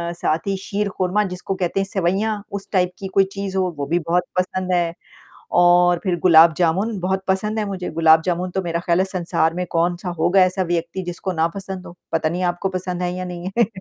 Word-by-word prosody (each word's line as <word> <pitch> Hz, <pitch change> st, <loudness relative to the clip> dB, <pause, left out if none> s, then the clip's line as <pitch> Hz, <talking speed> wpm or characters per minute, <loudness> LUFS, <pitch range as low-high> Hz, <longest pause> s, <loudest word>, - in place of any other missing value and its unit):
साथ 165 Hz, +2 st, -1 dB
ही 195 Hz, -, +1 dB
शीरखुरमा 200 Hz, 0 st, -1 dB
जिसको 185 Hz, +1 st, -4 dB
कहते 185 Hz, +1 st, -1 dB
हैं 195 Hz, -, 0 dB
सेवइयाँ 200 Hz, +3 st, 0 dB, 0.2 s
उस -, -, -18 dB
टाइप 180 Hz, -2 st, +2 dB
की 195 Hz, -, -5 dB
कोई 195 Hz, -, +7 dB
चीज़ 195 Hz, -1 st, -4 dB
हो 185 Hz, -1 st, +1 dB
वो 140 Hz, -, -2 dB
भी 170 Hz, +4 st, +1 dB
बहुत 170 Hz, +2 st, +1 dB, 0.2 s
पसंद 185 Hz, 0 st, -2 dB
है 170 Hz, -1 st, +1 dB, 0.7 s
और 175 Hz, 0 st, +5 dB
फ़िर 180 Hz, -2 st, +1 dB
गुलाब-जामुन 170 Hz, +5 st, +4 dB
बहुत 190 Hz, +1 st, -1 dB
पसंद 210 Hz, +3 st, 0 dB
है 215 Hz, -, 0 dB
मुझे। 185 Hz, -2 st, -4 dB
गुलाब-जामुन 165 Hz, +3 st, +3 dB
तो 190 Hz, +1 st, -2 dB
मेरा 170 Hz, -1 st, -2 dB
ख़याल 170 Hz, 0 st, +1 dB
है 190 Hz, -, +3 dB
संसार 170 Hz, -3 st, 0 dB
में 180 Hz, -, -2 dB
कौन-सा 175 Hz, +2 st, 0 dB
होगा 185 Hz, +4 st, +4 dB
ऐसा 185 Hz, +1 st, 0 dB
व्यक्ति 170 Hz, +2 st, -2 dB
जिसको 180 Hz, +2 st, -4 dB
ना 165 Hz, 0 st, +1 dB
पसंद 190 Hz, -1 st, -6 dB
हो? 175 Hz, -, -11 dB, 0.2 s
पता 160 Hz, -1 st, +1 dB
नहीं 175 Hz, +3 st, -3 dB
आपको 185 Hz, +2 st, -3 dB
पसंद 180 Hz, -1 st, -4 dB
है 180 Hz, 0 st, -1 dB
या 185 Hz, 0 st, -4 dB
नहीं 180 Hz, +1 st, -5 dB
है। 235 Hz, -, +5 dB
180 Hz, 210 wpm, -21 LUFS, 170-190 Hz, 0.7 s, कोई